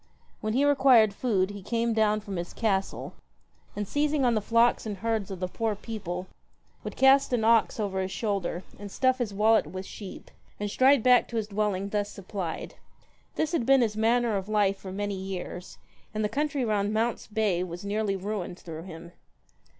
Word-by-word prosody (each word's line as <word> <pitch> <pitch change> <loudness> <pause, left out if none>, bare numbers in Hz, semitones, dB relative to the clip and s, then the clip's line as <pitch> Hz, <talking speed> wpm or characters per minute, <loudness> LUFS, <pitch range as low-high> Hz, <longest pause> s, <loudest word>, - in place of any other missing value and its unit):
When 215 0 -2
he 270 +4 +3
required 260 -7 +5
food, 200 -4 0
he 205 -1 -8
came 230 +3 0
down 215 -1 +2
from 200 -3 -6
his 175 0 -5
castle, 195 -4 -1 0.6
and 205 -1 -3
seizing 290 +1 +1
on 240 - +3
the 215 - +1
flocks 230 +2 +2
and 205 -2 -4
herds 220 0 -1
of 190 -2 -6
the 185 - -1
poor 220 +3 -2
people, 195 -4 -5 0.6
would - - -6
cast 270 0 +5
an 235 -3 +1
ox 225 0 +3
over 195 -3 -1
his 190 - -2
shoulder 195 -4 -2 0.2
and 205 -1 -8
stuff 260 +2 +2
his 235 -4 -1
wallet 215 -2 +3
with 185 +4 -6
sheep, 195 -1 -10 0.3
and 205 -1 -3
stride 260 0 +4
back 250 -1 +5
to 235 - -8
his 215 -1 -2
dwelling 200 -1 -1
thus 205 0 -1
supplied. 190 -4 -5 0.6
This 315 0 0
had 335 -8 0
been 270 +2 +5
his 220 -3 +1
manner 230 0 +2
of 195 +1 -5
life 205 -2 +2
for 190 -1 -8
many 205 +1 -3
years, 185 -2 -6 0.4
and 215 0 0
the - - 0
country 285 -1 -1
round 205 -2 0
Mount's 225 +1 -1
Bay 205 -5 0
was 175 +1 -7
nearly 205 0 0
ruined 190 -2 -4
through 160 -3 -8
him. 170 -1 -10
210 Hz, 190 wpm, -27 LUFS, 195-230 Hz, 0.6 s, required